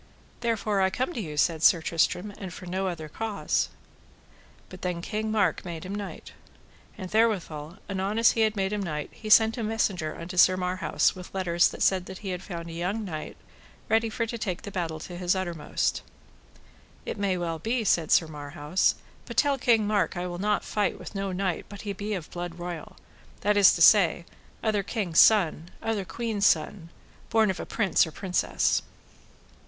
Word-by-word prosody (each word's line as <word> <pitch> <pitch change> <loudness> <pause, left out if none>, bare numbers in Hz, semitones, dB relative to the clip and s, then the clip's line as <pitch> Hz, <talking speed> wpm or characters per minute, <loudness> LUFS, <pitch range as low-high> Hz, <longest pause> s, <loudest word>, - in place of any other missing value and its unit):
Therefore 220 -4 0
I 190 - +4
come 255 - -2
to 235 - -3
you, 155 -6 -6
said 160 +1 +2
Sir 170 +1 +6
Tristram, 180 +5 0
and 190 -3 -6
for 180 - -9
none 190 +2 -2
other 165 -4 -4
cause. 215 +6 -1 1.0
But 185 - -12
then 180 -2 -2
King 215 +5 -3
Mark 215 -1 +1
made 170 -1 -6
him 190 - -5
knight. 205 -1 -7 0.6
And 185 -3 -7
therewithal, 180 -8 0
anon 195 +2 -2
as 230 0 +6
he 225 - 0
had 220 -1 +2
made 195 0 -1
him 210 - -1
knight, 150 -6 -4
he 215 - -8
sent 220 +2 +6
a - - -2
messenger 195 -7 -1
unto 180 +2 -7
Sir 185 +1 +6
Marhaus 185 +1 +1
with 180 -1 -10
letters 175 -3 +3
that - - -3
said 185 -2 +2
that 190 - -7
he - - -2
had 180 -1 -3
found 170 -4 -7
a 165 - -7
young 190 +6 -2
knight 155 -5 -6 0.5
ready 225 +1 +3
for 230 +2 -2
to 230 +1 -5
take 185 -2 -3
the 200 - -7
battle 170 -4 -3
to 175 - -8
the 185 +1 +1
uttermost. 170 -5 -2 1.0
It - - -5
may 195 -2 +1
well 165 -2 -3
be, 230 +7 -1
said 170 -6 +2
Sir 165 - +5
Marhaus; 150 +2 -1 0.3
but - - -8
tell 280 -2 +3
King 230 -3 +3
Mark 205 -3 0
I 175 - -2
will 175 -1 -5
not 210 +1 +1
fight 210 -1 0
with - - -9
no 195 -1 -2
knight 185 -1 -2
but 205 -1 -9
he 205 -1 -4
be 205 +2 -3
of 170 -5 -7
blood 175 -1 -5
royal, 175 -2 -7 0.4
that 205 +1 +2
is 200 -2 +7
to 170 - +3
say, 175 -4 +6 0.4
other 215 -2 +1
king's 195 -5 0
son, 175 -6 +5
other 220 -4 -2
queen's 220 -1 0
son, 165 +2 0 0.4
born 220 -3 +3
of 185 - -7
a - - -5
prince 195 -5 +2
or - - -8
princess. 185 +2 0
190 Hz, 195 wpm, -27 LUFS, 175-210 Hz, 1.0 s, is